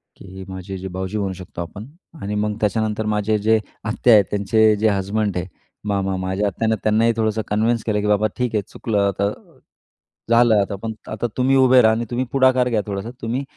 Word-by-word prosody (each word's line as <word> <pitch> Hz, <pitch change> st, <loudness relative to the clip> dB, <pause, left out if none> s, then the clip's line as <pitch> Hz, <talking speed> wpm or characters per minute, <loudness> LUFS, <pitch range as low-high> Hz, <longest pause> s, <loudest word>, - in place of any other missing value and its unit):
की 95 Hz, 0 st, -11 dB
माझे 95 Hz, +1 st, -6 dB
जे 95 Hz, +1 st, -6 dB
भावजी 95 Hz, +3 st, -4 dB
म्हणू 100 Hz, -2 st, -2 dB
शकतो 90 Hz, -2 st, -8 dB
आपण 100 Hz, +6 st, -8 dB, 0.4 s
आणि 105 Hz, +1 st, -3 dB
मग 105 Hz, 0 st, -1 dB
त्याच्यानंतर 110 Hz, 0 st, 0 dB
माझे 105 Hz, 0 st, 0 dB
जे 110 Hz, +2 st, +2 dB, 0.2 s
आत्या 115 Hz, +2 st, +3 dB
आहेत 105 Hz, -3 st, +6 dB
त्यांचे 105 Hz, +2 st, +3 dB
जे 110 Hz, +2 st, +1 dB
हसबंड 100 Hz, 0 st, -1 dB
आहे, 90 Hz, +1 st, -3 dB, 0.4 s
मामा 95 Hz, -1 st, 0 dB
माझ्या 95 Hz, +2 st, -1 dB
आत्यानं 110 Hz, +3 st, 0 dB
त्यांनाही 110 Hz, +2 st, +3 dB
थोडंसं 110 Hz, 0 st, 0 dB
कन्विन्स 110 Hz, +2 st, +1 dB
केलं, 105 Hz, -2 st, 0 dB
की 105 Hz, -, -2 dB
बाबा 105 Hz, +1 st, +3 dB
ठीक 125 Hz, -3 st, -1 dB
आहे, 105 Hz, -, +2 dB
चुकलं 105 Hz, -3 st, -1 dB
आता 100 Hz, 0 st, 0 dB
अ, -, -, -13 dB, 0.7 s
झालं 115 Hz, -3 st, +5 dB
आता 100 Hz, +1 st, -3 dB
पण 110 Hz, -1 st, -3 dB, 0.2 s
आता 110 Hz, +2 st, -2 dB
तुम्ही 130 Hz, +2 st, +3 dB
उभे 130 Hz, -1 st, +6 dB
रहा 110 Hz, -, +5 dB
आणि 115 Hz, +1 st, -1 dB
तुम्ही 125 Hz, +1 st, -1 dB
पुढाकार 130 Hz, -2 st, +3 dB
घ्या, 110 Hz, -3 st, +1 dB
थोडासा 100 Hz, +2 st, -4 dB
तुम्ही 120 Hz, +4 st, -2 dB
105 Hz, 200 wpm, -21 LUFS, 100-115 Hz, 0.7 s, आहेत